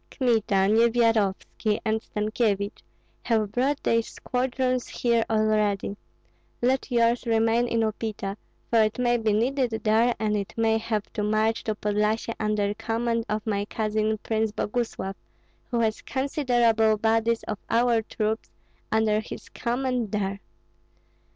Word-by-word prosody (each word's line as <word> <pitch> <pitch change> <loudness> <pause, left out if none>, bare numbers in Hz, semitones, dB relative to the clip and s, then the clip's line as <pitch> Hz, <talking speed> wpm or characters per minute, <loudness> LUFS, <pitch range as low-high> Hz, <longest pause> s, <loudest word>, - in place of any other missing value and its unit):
Kmita, 220 -7 +2
Nyevyarovski, 225 -2 +2
and 220 0 +1
Stankyevich 210 -2 -1 0.4
have 220 -3 0
brought 270 +5 0
their 230 0 +3
squadrons 255 +1 -2
here 235 -2 +1
already; 215 -2 +1 0.6
let 260 +3 +1
yours 235 0 +2
remain 225 +1 +2
in 230 -1 +1
Upita, 215 -2 -2 0.4
for 230 -1 +5
it 215 0 +1
may 240 -1 +2
be 220 -2 +1
needed 250 +4 +1
there, 230 +2 +3
and 215 -1 0
it 200 -1 -4
may 225 0 +2
have 220 -2 -3
to 210 - -2
march 215 +2 +1
to 215 - -1
Podlyasye 210 +2 0
under 210 -1 0
command 230 +1 -1
of 215 0 -2
my 205 -2 0
cousin 215 0 -1
Prince 220 -1 0
Boguslav, 210 -3 -2 0.6
who 240 - 0
has 220 -1 0
considerable 240 -6 +2
bodies 225 +1 +1
of 210 - -4
our 235 -1 +3
troops 220 0 -3 0.4
under 220 -1 +2
his 220 - -8
command 245 -2 -2
there. 200 -1 -1
225 Hz, 130 wpm, -26 LUFS, 215-235 Hz, 0.6 s, for